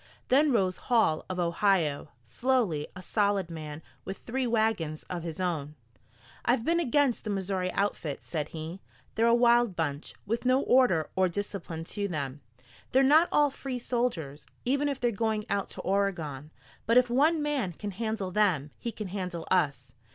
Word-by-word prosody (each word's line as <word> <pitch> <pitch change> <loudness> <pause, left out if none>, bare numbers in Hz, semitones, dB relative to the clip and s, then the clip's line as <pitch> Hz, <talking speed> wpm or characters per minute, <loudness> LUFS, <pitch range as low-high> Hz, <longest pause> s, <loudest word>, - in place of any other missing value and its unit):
Then 285 +3 +5
rose 190 -6 +1
Hall 220 -10 +3
of 185 - -3
Ohio, 170 -3 +1 0.2
slowly, 185 - 0
a 185 - -9
solid 200 -3 +1
man, 155 -1 -7 0.2
with 195 - -6
three 255 +1 -2
wagons 220 -9 0
of 175 -1 -3
his 165 +1 -6
own. 155 -5 -2 0.7
"I've 240 -1 +1
been 335 +1 +2
against 285 -4 +2
the 215 - -4
Missouri 190 -2 -1
outfit," 185 -7 -2
said 155 -3 -3
he. 165 +4 -7 0.3
"They're 225 +1 +2
a 235 - +6
wild 240 -3 +4
bunch, 145 -3 -3
with 230 +3 -2
no 255 +1 +3
order 245 - +3
or 185 -1 +3
discipline 175 -3 -5
to 200 +4 -3
them. 145 -5 -4 0.5
They're 265 +1 +5
not 310 +5 +5
all 295 -1 +4
free 265 -1 -5
soilers, 230 - -2 0.2
even 280 +3 +1
if 275 -2 -3
they're 240 -1 +1
going 220 0 -1
out 200 -1 0
to - - -7
Oregon. 170 -8 -1 0.4
But 230 +2 +5
if 250 0 +6
one 305 +6 +4
man 280 -11 0
can 205 +5 -5
handle 220 -2 -3
them, 180 -8 +1
he 235 - -3
can 215 -3 -6
handle 180 -3 -4
us. 140 -8 +1
200 Hz, 170 wpm, -29 LUFS, 165-240 Hz, 0.7 s, a